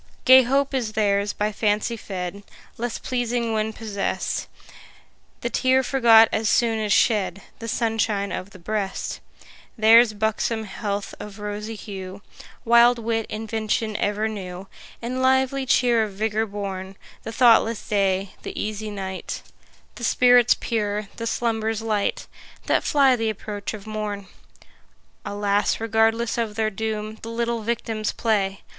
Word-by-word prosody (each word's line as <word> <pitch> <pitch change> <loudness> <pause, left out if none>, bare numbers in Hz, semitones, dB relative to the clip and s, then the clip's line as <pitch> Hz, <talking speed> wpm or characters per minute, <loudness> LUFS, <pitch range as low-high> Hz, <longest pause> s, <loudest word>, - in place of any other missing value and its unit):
Gay 260 +1 +9
hope 275 +3 +1
is 235 -5 -1
theirs 205 -1 +1
by 210 +1 -1
fancy 210 +2 0
fed, 190 -2 -6 0.3
Less 240 0 -3
pleasing 240 -2 -2
when 215 0 0
possest; 210 -3 -3 0.9
The - - -2
tear 260 0 +3
forgot 230 -4 +6
as 220 -1 0
soon 230 -2 +2
as 210 -1 -1
shed, 200 -4 +2 0.2
The 230 - -6
sunshine 220 -3 0
of 185 - -5
the 200 - -14
breast: 195 +2 -3 0.6
Theirs 225 +1 +6
buxom 220 +1 -1
health 200 0 -4
of 205 -1 -9
rosy 210 +1 -5
hue, 195 -2 -8 0.4
Wild 235 +1 +6
wit, 225 -1 -2
invention 220 0 -2
ever 210 +2 0
new, 190 -3 -7 0.4
And 255 +2 -2
lively 265 +1 +2
cheer 240 -1 +3
of 205 - -9
vigour 220 +2 -1
born; 195 -2 -6 0.2
The 225 - -6
thoughtless 230 -2 +4
day, 195 -2 +1
the - - -6
easy 215 0 -3
night, 190 -2 -5 0.5
The 240 - -10
spirits 245 0 +5
pure, 210 -3 -2
the 230 - -3
slumbers 225 -1 -1
light, 215 -2 -1 0.4
That - - +2
fly 275 -3 +4
th' 225 -2 -1
approach 210 0 -5
of 205 -1 -11
morn. 210 -2 -4 1.0
Alas, 205 0 0
regardless 225 +1 +1
of 220 -3 -2
their 220 0 0
doom, 215 +1 -4
The 225 - -7
little 235 0 -2
victims 220 -1 -2
play! 195 -4 -1
220 Hz, 140 wpm, -23 LUFS, 205-230 Hz, 1.0 s, Gay